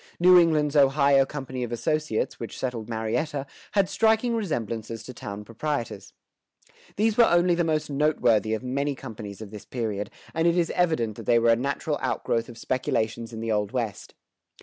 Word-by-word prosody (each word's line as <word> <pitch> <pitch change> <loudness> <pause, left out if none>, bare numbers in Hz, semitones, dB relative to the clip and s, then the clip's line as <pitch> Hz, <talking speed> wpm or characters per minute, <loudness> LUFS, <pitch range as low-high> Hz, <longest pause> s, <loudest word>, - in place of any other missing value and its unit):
New 180 +1 +8
England's 155 -3 +2
Ohio 140 -1 +5
Company 130 -3 -5
of 120 - -5
Associates, 150 0 -1
which 115 - -6
settled 120 -4 -4
Marietta, 120 +6 -2 0.3
had 200 -2 +3
striking 225 +3 +2
resemblances 115 - -3
to 125 - -9
town 105 -2 -7
proprietors. 120 +2 -4 0.8
These 220 +1 +1
were 235 - +8
only 175 -1 +4
the 170 0 +1
most 155 -2 0
noteworthy 125 -7 +2
of 110 - -6
many 140 +3 -1
companies 110 -5 -8
of 105 -2 -8
this 105 -2 -9
period, 105 -5 -3 0.2
and 165 +1 +2
it 170 +1 +3
is 170 -1 +1
evident 160 - 0
that 115 - -9
they 120 - +5
were 115 0 +4
a - - +5
natural 140 +4 -2
outgrowth 115 0 -1
of 120 - -11
speculations 115 -2 -2
in 110 -1 -6
the 115 0 -2
Old 105 -1 0
West. 115 -6 -4
130 Hz, 175 wpm, -26 LUFS, 115-155 Hz, 0.8 s, New